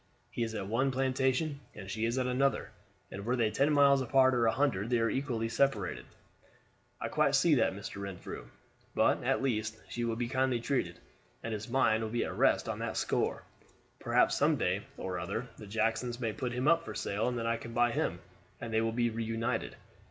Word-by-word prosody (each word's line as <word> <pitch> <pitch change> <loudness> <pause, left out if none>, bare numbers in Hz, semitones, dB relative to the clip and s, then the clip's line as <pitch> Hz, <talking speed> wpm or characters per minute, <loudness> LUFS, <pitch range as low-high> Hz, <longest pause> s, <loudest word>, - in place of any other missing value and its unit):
He 125 - -4
is 115 -1 -1
at 100 - -3
one 120 +7 +1
plantation 130 +3 0 0.2
and 95 -2 -8
she 110 +3 -2
is 115 +2 -1
at 130 - +1
another, 130 +2 +1 0.4
and 100 - -6
were 120 +4 0
they 115 -3 +1
ten 140 +7 +2
miles 140 -2 +5
apart 130 +1 +4
or 120 -2 +3
a - - +4
hundred, 120 -7 0
they 125 - +3
are 115 0 +1
equally 125 -5 -1
separated." 135 - 0 0.9
"I - - -2
quite - - +2
see - - +4
that, - - +3
Mr. 100 - -7
Renfrew; 100 -2 -7 0.5
but, - - +3
at - - +1
least, 110 -4 -1
she 120 - -3
will 115 -1 0
be 120 +1 -2
kindly 130 -1 +1
treated, 115 -9 -1 0.5
and 115 - -3
his 110 +3 -5
mind 115 -3 +3
will 110 - -2
be 120 +2 0
at - - -5
rest - - +3
on - - -3
that - - -3
score. - - 0 0.6
Perhaps - - +3
some - - +3
day - - 0 0.2
or 90 -1 -3
other 115 +8 -4
the 105 - -10
Jacksons 115 +3 -1
may 115 -3 -1
put 125 -1 -3
him 125 +3 -1
up 170 +1 +4
for 110 - -7
sale, 100 +2 -1
and 125 -1 -1
then 115 - -2
I 115 0 +1
can 115 0 -9
buy 120 +1 +3
him, 90 -5 -1 0.4
and 115 -1 -6
they 110 - +3
will 115 0 0
be 120 0 +1
reunited. 115 0 -2
115 Hz, 210 wpm, -31 LUFS, 110-130 Hz, 0.9 s, miles